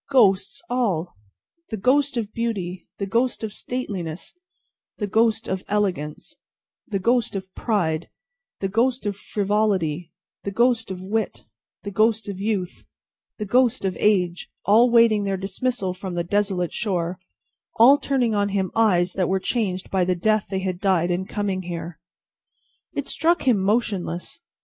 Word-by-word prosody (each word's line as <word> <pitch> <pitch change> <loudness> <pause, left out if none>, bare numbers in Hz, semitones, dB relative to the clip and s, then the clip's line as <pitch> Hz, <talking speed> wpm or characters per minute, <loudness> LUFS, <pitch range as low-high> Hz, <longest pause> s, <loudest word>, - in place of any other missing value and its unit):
Ghosts 250 +1 +3
all! 195 -9 -1 0.5
The 220 - -3
ghost 265 +5 +2
of 215 -2 -3
beauty, 195 -6 -3
the 200 - -2
ghost 235 +4 0
of 215 -2 -3
stateliness, 190 -11 -5 0.6
the 210 - -1
ghost 225 +2 +2
of 190 0 -2
elegance, 185 -8 -2 0.5
the 205 - -1
ghost 235 +3 +1
of 190 -1 -6
pride, 170 -8 -1 0.5
the 195 - +1
ghost 240 +5 +1
of 205 -1 -1
frivolity, 195 -6 0 0.3
the - - -2
ghost 235 +1 +2
of 185 -1 -5
wit, 215 +2 -2 0.4
the 200 - -5
ghost 220 +2 +2
of 195 -1 -5
youth, 200 -4 -2 0.5
the 210 - -3
ghost 245 +1 +2
of 190 - 0
age, 180 -4 +1 0.2
all 225 +5 +6
waiting 230 -3 +5
their 195 -1 -1
dismissal 195 +1 -2
from 185 -1 -6
the 170 - 0
desolate 190 -1 0
shore, 180 -5 -1 0.6
all 265 +6 +7
turning 250 -5 +1
on 205 -1 +1
him 195 -2 -1
eyes 185 -6 +3
that 185 -3 0
were 190 0 +2
changed 190 -3 -2
by 190 -2 +2
the 180 0 +1
death 215 +4 +1
they 190 -1 -2
had 185 -2 -2
died 180 -3 +2
in 180 +2 -1
coming 200 -2 -2
there. 170 -2 -6 0.9
It 285 - -2
struck 335 +4 +1
him 245 -6 +3
motionless. 195 - -1
200 Hz, 155 wpm, -23 LUFS, 185-225 Hz, 0.9 s, all